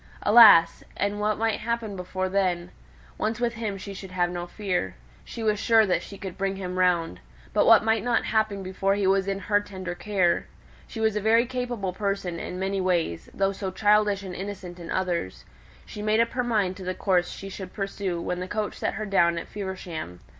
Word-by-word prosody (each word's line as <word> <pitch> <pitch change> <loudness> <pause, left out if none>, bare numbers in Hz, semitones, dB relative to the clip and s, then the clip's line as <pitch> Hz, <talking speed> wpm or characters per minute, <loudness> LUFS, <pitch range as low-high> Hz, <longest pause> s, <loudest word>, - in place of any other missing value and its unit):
Alas! 210 -6 +7
and 205 +1 -1
what 210 0 0
might 225 0 0
happen 230 -2 -3
before 185 0 -3
then! 185 -2 0 0.5
Once 220 +2 -1
with 240 -1 0
him 215 -3 -4
she 200 +1 -8
would 190 - -9
have 175 -1 0
no 175 0 -4
fear; 180 - -2 0.3
she 230 - -7
was 210 -1 +1
sure 225 -1 +5
that 185 - +1
she 200 - -10
could 190 -3 -8
bring 195 0 0
him 185 -1 -4
round; 170 - +1 0.3
but - - +3
what - - +7
might 220 -1 +1
not 240 -1 +1
happen 215 -3 0
before 195 +1 0
he 200 -1 0
was 195 0 +2
in 195 0 -1
her 205 +1 +1
tender 185 -3 -6
care? 185 -2 0 0.4
She 225 - -8
was 220 -1 +1
a 210 - 0
very 225 +3 +4
capable 245 -6 -3
person 195 -4 -2
in 180 - -5
many 195 +1 -1
ways, 170 - -1
though 195 0 0
so 195 0 -4
childish 205 0 +2
and 185 -2 -6
innocent 190 -2 -7
in 170 - -9
others. 175 - -2 0.4
She 210 - -8
made 215 +1 +2
up 230 0 +2
her 250 - -1
mind 210 -6 0
to 190 - -8
the 185 0 -3
course 180 -3 +1
she 195 - -8
should 190 -1 -8
pursue 195 -3 -3
when 180 +1 -3
the 180 - -4
coach 210 +1 -3
set - - -1
her 215 0 -3
down 170 -4 +3
at 170 - -5
Feversham. 180 - -6
195 Hz, 210 wpm, -26 LUFS, 180-215 Hz, 0.5 s, Alas